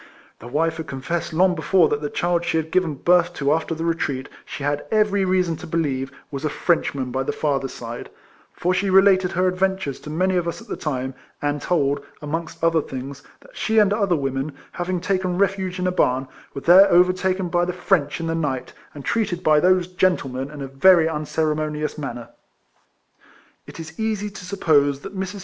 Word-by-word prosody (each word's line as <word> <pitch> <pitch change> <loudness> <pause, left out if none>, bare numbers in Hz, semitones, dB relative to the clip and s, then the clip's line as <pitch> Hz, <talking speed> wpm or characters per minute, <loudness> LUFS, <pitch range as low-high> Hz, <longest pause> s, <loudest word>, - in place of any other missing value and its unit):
The 115 - -10
wife 160 +5 0
had 160 -1 -6
confessed 140 +6 -3
long 180 +3 +3
before 175 +1 +3
that 145 - -1
the 145 - -3
child 175 +1 0
she 170 - 0
had 160 0 -2
given 180 -5 +1
birth 175 +4 +3
to 140 +1 +1
after 165 +1 -1
the 165 +1 -4
retreat, 140 -5 -2 0.2
she 140 - -7
had 145 0 -1
every 210 -3 +2
reason 180 -3 +1
to 175 - -9
believe, 140 -5 -1 0.2
was 140 0 -5
a 155 - 0
Frenchman 140 -6 0
by 130 +1 -1
the 135 - -1
father's 135 -3 -2
side; 120 0 -7 0.4
for 180 +1 -1
she 195 +2 0
related 190 -1 +5
her 185 +1 +2
adventures 185 -5 -1
to - - -10
many 185 +4 +1
of 175 -1 -1
us 170 - -3
at - - -14
that - - -5
time, 130 -3 -3 0.3
and 145 0 -1
told, 145 -4 0 0.2
amongst 160 +2 -5
other 165 -1 +3
things, 135 +1 -7 0.2
that - - -19
she 220 - -1
and 205 -2 +5
other 200 -4 +1
Avomen, 135 0 -2 0.2
having 180 0 -2
taken 185 -1 -1
refuge 190 -1 0
in 185 - -2
a 185 - +2
barn, 130 -6 +1 0.3
were 140 - -4
there 185 +5 +7
overtaken 185 +1 +3
by 175 0 +2
the 180 - 0
French 155 -5 0
in 165 - -3
the 165 - -1
night, 145 -6 -2 0.2
and 145 - -9
treated 195 -6 -1
by 155 -2 +5
those 180 +1 +3
gentlemen 170 -8 0
in 145 -2 -7
a - - -5
very 160 +5 +5
un 155 -2 -3
ceremonious 155 -1 -1
manner. 120 -5 -6 1.4
It - - -11
is 160 +2 -9
easy 215 -2 -1
to 195 -2 -10
suppose 145 -7 +2
that 200 - -9
]\Irs. 190 +1 -4
165 Hz, 200 wpm, -22 LUFS, 145-185 Hz, 1.4 s, there